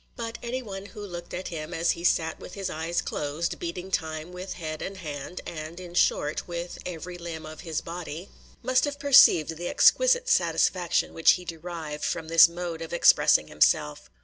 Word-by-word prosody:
But 230 -1 -6
any 255 +2 -4
one 195 -2 -7
who 210 -1 -9
looked 175 -2 -8
at 185 - -5
him, 165 0 -6
as 165 +1 +2
he 170 - -5
sat 160 -2 +1
with - - -10
his 195 -1 -4
eyes 165 +2 -2
closed, 150 +3 -3
beating 175 +2 -5
time 160 -1 -3
with 180 +1 -6
head 155 -3 -6
and 195 0 -5
hand, 150 0 -7
and, 160 +1 -7
in 175 -1 -10
short, 150 -3 +1
with 175 0 -6
every 175 +1 -7
limb 165 -2 -7
of 155 0 -10
his 160 -2 -3
body, 170 +1 -7 0.3
must 255 +3 +3
have 290 -1 -4
perceived 255 - +6
the 175 +1 -4
exquisite - - +4
satisfaction 180 - +1
which 165 - +5
he 180 - -5
derived 165 -3 -6
from 160 -1 -2
this 165 0 +8
mode 170 -1 -5
of 165 +1 -6
expressing 170 - +5
himself. 75 0 +1
170 Hz, 185 wpm, -26 LUFS, 160-185 Hz, 0.3 s, this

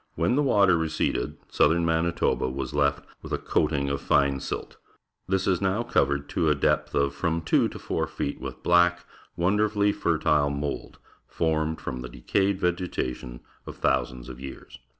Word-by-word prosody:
When - - +1
the 145 - +3
water 100 -10 +4
receded, 80 -1 -1
southern 85 +1 +3
Manitoba 80 -4 +1
was 65 -1 -4
left 70 -1 +1 0.2
with - - -10
a - - +1
coating 75 -3 0
of 70 0 -2
fine 70 -1 +2
silt. - - -5 0.5
This 95 0 0
is 95 -1 +1
now 100 +4 +1
covered 70 -8 +1
to 80 - +1
a 75 - +3
depth 70 - 0
of 70 0 +2
from 80 +2 -1
two - - +3
to - - -8
four - - -2
feet 70 - -4
with - - -7
black, 85 0 +3 0.3
wonderfully 105 +3 +2
fertile 75 -7 +1
mould, 70 0 -4 0.3
formed 80 -1 -1
from 65 - -5
the 60 - -7
decaj'ed 95 +9 0
vegetation 85 -9 -3 0.3
of - - -7
thousands 65 -1 0
of 65 -1 -9
years. 65 -2 -10
80 Hz, 165 wpm, -26 LUFS, 70-90 Hz, 0.5 s, water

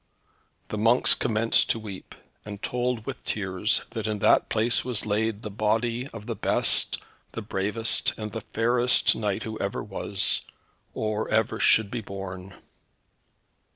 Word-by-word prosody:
The 105 - -3
monks 115 +3 +5
commenced 115 -1 +2
to 115 - +1
weep, 100 -4 -9 0.3
and 105 -1 -8
told 125 -1 -2
with - - -6
tears, 100 +1 -1
that 110 -2 -4
in 105 -1 -1
that - - +3
place 115 +3 +2
was 120 -3 -1
laid 110 +1 -1
the 105 - -5
body 115 +4 0
of 115 -5 -10
the - - -4
best, - - +3 0.4
the 115 - -5
bravest, 105 +2 0
and 110 -1 -5
the 115 - -5
fairest 120 +3 +2
knight 105 -3 -2
who 110 0 -6
ever 100 - -3
was, 100 -1 0 0.5
or 110 0 -2
ever 110 +2 +1
should 110 -2 +4
be 120 - -3
born. 95 -1 -8
110 Hz, 150 wpm, -26 LUFS, 105-115 Hz, 0.5 s, monks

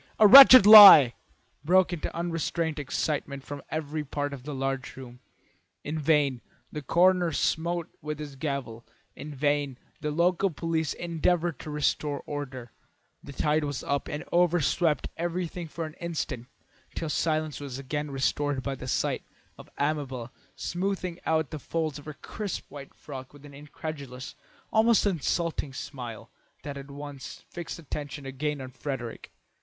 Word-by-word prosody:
A 215 - +6
wretched 255 -1 +11
lie!" 200 - +11 0.5
broke 180 +2 +3
in 165 - -5
unrestrained 165 -1 -2
excitement 140 -1 -3
from 145 0 -8
every 155 0 -3
part 145 0 -4
of 135 - -8
the 150 -2 -5
large 135 -1 -3
room. 125 -2 -11 0.6
In 155 +2 -4
vain 145 -4 +1 0.3
the 150 - -5
coroner 175 +4 +3
smote 170 +3 -1
with 150 0 -5
his 150 -2 -8
gavel, 135 -5 -5 0.3
in 145 +2 -9
vain 145 -1 -1 0.2
the 150 - -3
local 175 +5 +1
police 160 -2 -2
endeavoured 170 -2 -1
to - - -8
restore 150 -1 -1
order; 130 -5 -6 0.5
the - - -10
tide 150 +3 0
was 145 -2 -4
up 140 0 -2
and 150 - -5
over 175 0 +3
swept 155 +1 0
everything 175 0 -4
for 165 +1 -5
an 155 - -9
instant 150 -8 -4 0.5
till 165 - -3
silence 155 0 -1
was 140 -3 -7
suddenly 145 +2 -4
restored 135 0 -1
by 140 - -3
the 130 -1 -8
sight - - -1 0.3
of - - -14
Amabel 135 -5 -3 0.2
smoothing 180 -1 -3
out 160 -3 0
the 155 - -6
folds 155 0 -3
of 145 - -15
her 155 -1 -8
crisp 205 +3 -6
white 140 -1 -11
frock 130 -2 -10
with 145 0 -15
an 145 - -13
incredulous, 140 -2 -8 0.4
almost 225 0 +4
insulting, 170 -5 -1
smile 125 -5 -8 0.3
that 145 0 -6
at 140 0 -9
once 145 -1 -9
fixed 175 -2 -7
attention 145 -2 -7
again 145 +2 -3
on 130 -1 -8
Frederick. 130 -3 -6
150 Hz, 150 wpm, -27 LUFS, 140-165 Hz, 0.6 s, wretched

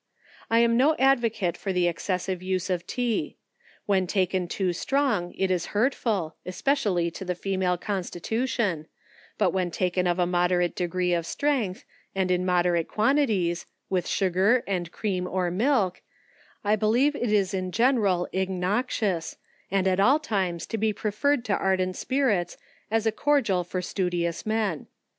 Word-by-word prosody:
I 230 - +3
am 235 0 +3
no 295 +5 +4
advocate 230 -9 +2
for 195 - -4
the 180 -1 +2
excessive 185 +1 -2
use 185 0 -2
of 180 0 -2
tea. 245 -3 -2 0.5
When 190 -3 +2
taken 185 -1 0
too 185 0 -1
strong, 235 -4 0
it 190 -1 +1
is 180 -2 0
hurtf 255 +3 +1
il, 180 -8 0
especially 185 -5 0
to 180 - -7
the 180 -1 -2
female 185 -1 0
constitution; 195 -1 -2 0.5
but - - +2
when 185 -2 0
taken 180 +1 0
of 175 0 +1
a 180 - +2
mod' 180 0 +1
rate 175 -1 +1
degree 180 0 0
of 170 -1 -1
strength, 260 -11 -1 0.3
and 190 -1 +1
in 180 0 +1
moderate 175 -2 +2
quantities, 215 -8 +1 0.2
with 185 -2 0
sugar 195 +6 +2
and 175 -3 -2
cream, 185 -4 -2
or 180 -1 -1
milk, 205 -2 +1 0.6
I 210 +1 +3
believe 235 +7 +2
it 240 -6 -1
is 200 -3 +2
in 185 -1 -2
gen; 245 +5 +3
rid 185 -4 +1
innoxious, 190 0 -1 0.3
and 190 0 +1
at 185 0 +2
all 255 +9 +5
times 190 - -2
to 225 - -4
be 220 0 +1
preferred 235 +6 0
to 210 - 0
ardent 185 -1 0
spirits, 230 -11 0 0.3
as 225 +1 +1
a 220 - +3
cordial 225 -8 +1
for 180 +1 -4
studious 175 -1 -2
men. 215 -7 -1
190 Hz, 160 wpm, -26 LUFS, 180-225 Hz, 0.6 s, all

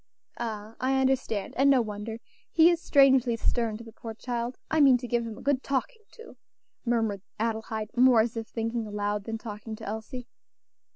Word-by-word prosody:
"Ah, 220 -2 -5
I 265 +1 +1
understand! 260 -6 0
and 275 +2 +5
no 270 -2 +6
wonder; 215 0 -4 0.3
he 335 +1 +6
is 340 -1 -1
strangely 265 -6 +5
stern 230 -1 0
to 230 - -10
the 225 - -12
poor 225 0 -8
child. 240 +1 -3
I 315 - +3
mean 270 -3 +7
to 245 0 -7
give 235 -1 0
him 220 -2 -7
a - - -11
good 275 -2 +1
talking 280 - -2
to," 460 - -13 0.5
murmured 225 -5 0 0.2
Adelaide, 220 0 -3
more 250 -2 +6
as 230 +1 -2
if 225 -1 -4
thinking 230 0 -3
aloud 205 0 -2
than 225 -1 -3
talking 220 -1 -7
to - - -10
Elsie. 220 +4 -6
230 Hz, 185 wpm, -28 LUFS, 220-260 Hz, 0.5 s, mean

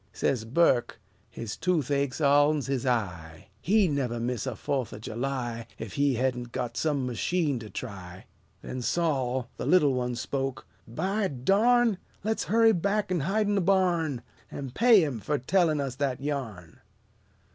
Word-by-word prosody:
Says 115 -2 -1
Burke, 125 -2 +2 0.3
"His 115 -1 -6
toothache's 140 -5 0
all'n 145 +1 +4
his 135 -2 -2
eye! 90 -7 -3
He 205 +1 +3
never'd 125 -6 -1
miss 125 +1 -2
a 130 - -3
Fo'th 130 +1 -2
o' - - -7
July, 120 +1 -4
Ef 110 -3 -6
he 140 -2 +2
hedn't 125 -1 -1
got 120 -1 -4
some 145 -4 0
machine 140 +3 0
to 110 -2 -9
try." 95 -7 -8 0.4
Then 130 - -5
Sol, 130 -5 0
the - - -4
little 150 -7 +4
one, 125 -1 -1
spoke: 135 +2 -3 0.2
"By 195 - -1
darn! 205 - +3 0.2
Le's 220 +2 -1
hurry 225 +1 +4
back 200 +2 0
an' 180 - +1
hide'n 205 +7 +1
the 200 - +2
barn, 170 -8 +1 0.3
An' 135 -3 -6
pay 225 - +5
him 140 -7 -2
fur 145 +9 -1
tellin' 160 +2 +2
us 135 -3 -2
that 135 -3 -1
yarn!" 125 - -5
135 Hz, 155 wpm, -27 LUFS, 120-175 Hz, 0.4 s, pay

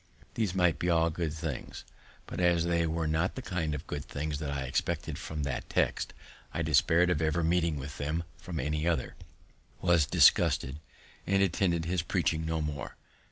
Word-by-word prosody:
These 105 -5 -1
might 90 -3 +3
be 90 - 0
all 85 -1 +3
good 80 -1 -2
things; 80 -4 -5 0.4
but, - - -6
as 85 -2 +3
they 85 -1 +1
were 80 0 -1
not 80 +4 0
the 130 - -4
kind 80 -7 -2
of 75 - -7
good 70 -1 -4
things 75 +1 -4
that 75 -2 -3
I 70 -1 -2
expected 80 +4 -2
from 80 -2 -4
that 65 -3 -3
text, - - 0 0.4
I 85 - 0
despaired 80 +3 +4
of 80 -3 0
ever 80 +2 +1
meeting 85 -1 +2
with 70 +1 -7
them 75 +4 -1 0.2
from 90 -5 -5
any 75 +4 -1
other, 80 -7 0 0.7
was 85 -4 +3
disgusted, 65 0 +4 0.5
and 100 +1 +3
attended 85 -2 +1
his 90 0 0
preaching 80 -1 0
no 80 -1 -1
more. 75 -2 -4
80 Hz, 180 wpm, -30 LUFS, 75-85 Hz, 0.7 s, despaired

